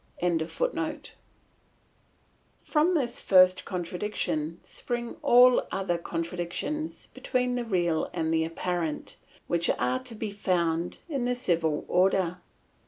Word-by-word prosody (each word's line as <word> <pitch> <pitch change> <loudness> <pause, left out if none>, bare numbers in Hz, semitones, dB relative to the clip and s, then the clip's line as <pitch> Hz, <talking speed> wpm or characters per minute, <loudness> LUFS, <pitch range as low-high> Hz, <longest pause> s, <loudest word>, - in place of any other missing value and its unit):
] - - -26 2.4
From 325 +4 +2
this 255 -6 -1
first 185 -1 +5
contradiction 175 -3 -2
spring 240 -1 -4
all 250 +1 +7
the - - -1
other 190 -3 -1
contradictions 175 - -4
between 250 -1 -1
the 245 -1 -1
real 175 -6 +1
and 160 0 -1
the 160 0 +2
apparent, 165 -1 -3 0.3
which 170 0 +1
are 125 +1 +1
to 235 -3 -6
be 215 -1 -4
found 175 -4 -1
in 275 -7 -2
the 250 0 +1
civil 165 -9 0
order. 180 -1 +2
180 Hz, 115 wpm, -28 LUFS, 170-240 Hz, 2.4 s, all